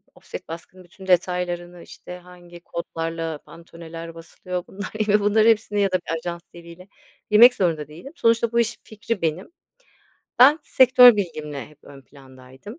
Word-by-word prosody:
ofset - - -10
baskının 170 +3 -11
bütün 190 +2 -15
detaylarını, 175 -1 -1
işte, 180 - -11
hangi 175 -1 -15
kodlarla 165 -2 -5
pantone'ler 165 0 -12
basılıyor, 180 +2 -7
bunlar 200 0 -8 0.2
ya 205 - +1
da 210 - +5
bunların 215 +2 +3
hepsini 210 -2 +1
ya 195 -1 +1
da - - 0
bir 165 - -2
ajans 170 +1 -6
diliyle 170 +2 -14 0.4
bilmek 235 +4 +8
zorunda 165 - -1
değilim. 170 - -12
Sonuçta 230 -4 +1
bu 235 - +1
işin 230 -1 -1
fikri 215 0 -6
benim. 165 - -3 0.9
Ben 280 +6 +7
sektör 250 -5 +6
bilgimle 155 -7 -5
hep 150 - -21
ön 140 -1 -14
plandaydım 130 - -15
180 Hz, 155 wpm, -22 LUFS, 165-210 Hz, 0.9 s, bilmek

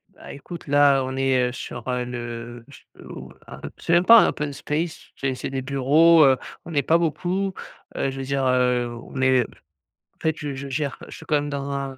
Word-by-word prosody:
Bah, - - -11
écoute 160 +3 -10
là 140 -1 +4
on 130 0 -4
est, 130 -2 +2
heu, - - -6
sur, 120 -1 -8
heu, 125 -1 -1
le 120 -1 -7
ch 140 - -16 0.2
ou, - - -10 0.2
heu - - -11 0.2
c'est 170 - -1
même 175 +1 +4
pas 230 +2 +9
un - - +3
open 150 -1 -3
space 155 +4 -4
c'est 135 -1 -2
c'est 125 - -5
des 135 -1 -3
bureaux, 145 +5 +4
heu, 135 -1 +4 0.3
on 170 - -8
n'est 145 - +1
pas 160 +5 +3
beaucoup, 180 +4 -1 0.4
heu, - - -1
je 135 - -7
veux 135 - -4
dire, 135 0 -1
heu, 125 -1 +2
on 120 +3 -7
est 130 -1 +4
en - - -9 0.8
fait, 160 -1 0
je 145 -2 -5
je 140 +1 -7
gère, 140 0 -3
je - - -10
suis 160 - -12
quand 155 - +1
même 145 0 -1
dans 140 -1 -4
un 135 -1 -4
135 Hz, 225 wpm, -23 LUFS, 130-150 Hz, 0.8 s, pas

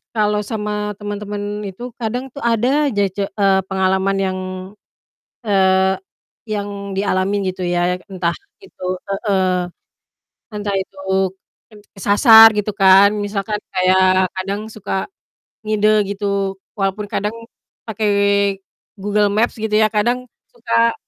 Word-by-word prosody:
kalau 210 -1 +1
sama 210 -1 -3 0.3
temen-temen 205 0 -5
itu 195 +5 -9 0.2
kadang 240 +2 -2
tuh 280 - -9
ada 260 +7 +2
aja 205 -7 0
ce 205 - -2
eee, 195 -2 +2
pengalaman 190 0 +1
yang, 185 0 -2 1.1
eee, 190 -1 +3 0.5
yang 205 -2 -3 0.3
dialamin 195 0 0
gitu 185 0 -7
ya 175 0 0 0.2
yak - - -20
entah 175 -3 -1 0.3
itu 390 - -14 0.3
heeh. 195 -2 0 1.1
Entah 205 -1 -3
itu 190 - -9 0.7
ken 215 -2 -16 0.2
kesasar 220 +3 +8
gitu 210 0 -1
kan, 195 +1 +7 0.2
misalkan 205 +1 -3 0.2
kayak 185 0 +4
kadang 195 +2 -3
suka 195 -2 -3 0.6
ngide 215 0 +1 0.2
gitu 205 +1 -4 0.5
walaupun 195 +1 -1
kadang 210 +1 -1 0.6
pakai 220 -1 -1 0.9
Google 205 +1 +1
Maps 220 +4 +1
gitu 220 -1 -2
ya, 215 - +4
kadang 240 +4 0 0.2
suka, 230 0 +1
205 Hz, 120 wpm, -19 LUFS, 190-215 Hz, 1.1 s, kesasar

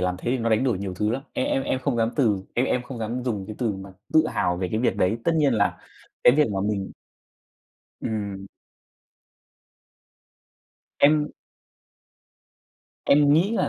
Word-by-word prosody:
làm 90 0 0
thế 120 - -3
thì 130 - +1
nó 115 0 0
đánh 110 +4 +2
đổi 115 -8 +1
nhiều 95 -2 -4
thứ 105 +4 0
lắm. 130 +3 -2
Em - - -1
em 135 - 0
em 130 - -1
không 125 - -1
dám 115 0 +1
từ 105 -9 +2
em 125 +2 +2
em 125 - 0
không 125 -1 -8
dám 115 +3 -3
dùng 105 -6 -2
cái 110 - -7
từ 115 -4 0
mà 95 0 -9 0.2
tự 155 0 +5
hào 90 0 0
về 90 0 -2
cái 110 - -1
việc 125 - +1
đấy. 100 +6 +1
Tất 170 - +3
nhiên 145 -4 +3
là 100 -1 +1 0.5
cái 120 - +8
việc 150 - +5
mà 95 - -1
mình 100 -2 -3 1.1
Ừm. 100 -3 -4 2.5
Em 150 +1 +4 1.7
Em 145 0 +5
nghĩ 170 +7 +3
là 230 - +1
115 Hz, 180 wpm, -24 LUFS, 100-135 Hz, 2.5 s, cái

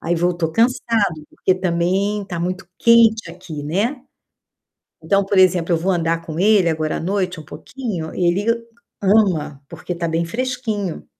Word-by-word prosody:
Aí 170 +1 -1
voltou 170 -1 0
cansado, 225 - +1
porque 185 - +1
também 185 +3 0
tá 175 -3 -5
muito 185 +2 -3
quente 225 -5 +4
aqui, 170 -4 -8
né. 205 - -1 1.0
Então, 195 0 +1
por 195 0 0
exemplo, 180 -2 +4
eu - - +3
vou 180 +4 0
andar 165 -1 0
com 160 0 -5
ele 200 -3 +4
agora 155 -1 -1
à - - -5
noite 185 0 -2
um - - -9
pouquinho, 195 -8 -6
ele 180 +3 +1 0.6
ama, 190 -9 +2
porque 170 +2 -6
tá 170 -1 -3
bem 165 +1 0
fresquinho. 220 -3 -3
180 Hz, 155 wpm, -20 LUFS, 170-205 Hz, 1.0 s, quente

